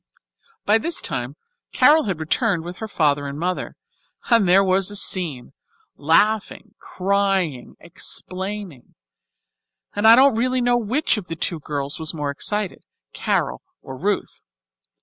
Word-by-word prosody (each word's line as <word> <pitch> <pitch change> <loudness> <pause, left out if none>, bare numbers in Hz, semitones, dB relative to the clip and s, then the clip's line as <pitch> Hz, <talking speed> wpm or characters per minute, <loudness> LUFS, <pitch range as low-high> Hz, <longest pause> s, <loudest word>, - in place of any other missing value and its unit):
By 215 +2 +4
this 340 +8 0
time 135 -2 -3 0.4
Carol 310 0 +5
had 190 -6 -3
returned 175 +2 0
with 175 +2 -8
her 220 - -6
father 145 -7 0
and 140 +1 -6
mother, 180 +3 -3 0.6
and 230 -5 +5
there 190 +2 +5
was 190 0 +1
a 205 - -6
scene 165 -11 0 0.4
laughing, 205 +7 +1
crying, 190 -8 -1
explaining 185 -2 -6 1.0
and 205 +2 +2
I 225 - +10
don't 270 +1 +5
really 255 +3 0
know 245 0 +2
which 240 +4 0
of 195 -4 -6
the 165 - -5
two 165 0 -3
girls 145 -1 -4
was 160 +1 -2
the - - -8
more 145 -1 -2
excited, 205 +6 -3 0.3
Carol - - -1 0.2
or 130 - -8
Ruth. 195 +9 -3
190 Hz, 145 wpm, -21 LUFS, 155-215 Hz, 1.0 s, I